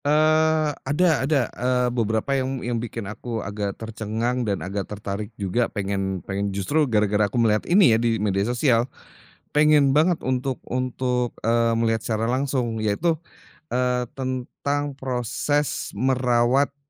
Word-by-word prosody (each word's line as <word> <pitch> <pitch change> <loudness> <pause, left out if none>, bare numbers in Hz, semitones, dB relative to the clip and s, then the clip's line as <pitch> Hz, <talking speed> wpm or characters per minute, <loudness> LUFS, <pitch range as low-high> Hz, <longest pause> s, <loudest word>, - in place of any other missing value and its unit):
Eee, 155 +1 +3
ada 155 +4 +2
ada. 145 -4 +3
Eee, 125 0 +1
beberapa 110 +2 0
yang 135 0 -1
yang 120 -2 -1
bikin 115 -2 -5
aku 115 +3 -5
agak 100 0 -3
tercengang 115 +2 -2
dan 100 - 0
agak 95 +1 -4
tertarik 105 0 -5
juga 105 +4 0
pengen 95 -2 -3
pengen 100 +1 -2
justru 130 +10 0
gara-gara 105 -1 +2
aku 110 - -4
melihat 110 -2 +2
ini 175 - +6
ya 110 - +2
di 115 -1 +1
media 100 -2 0
sosial, 120 +2 +2 0.7
pengen 150 -2 +5
banget 160 +3 +3
untuk 130 0 -2
untuk, 125 -1 -1 0.2
eee, 115 0 +3
melihat 115 -1 +1
secara 110 0 -1
langsung 125 -3 -1
yaitu, 150 +11 +1 0.6
eee, 125 0 +1 0.2
tentang 135 +3 -2
proses 130 +3 -1
merawat 125 +3 +2
120 Hz, 140 wpm, -24 LUFS, 110-135 Hz, 0.7 s, ini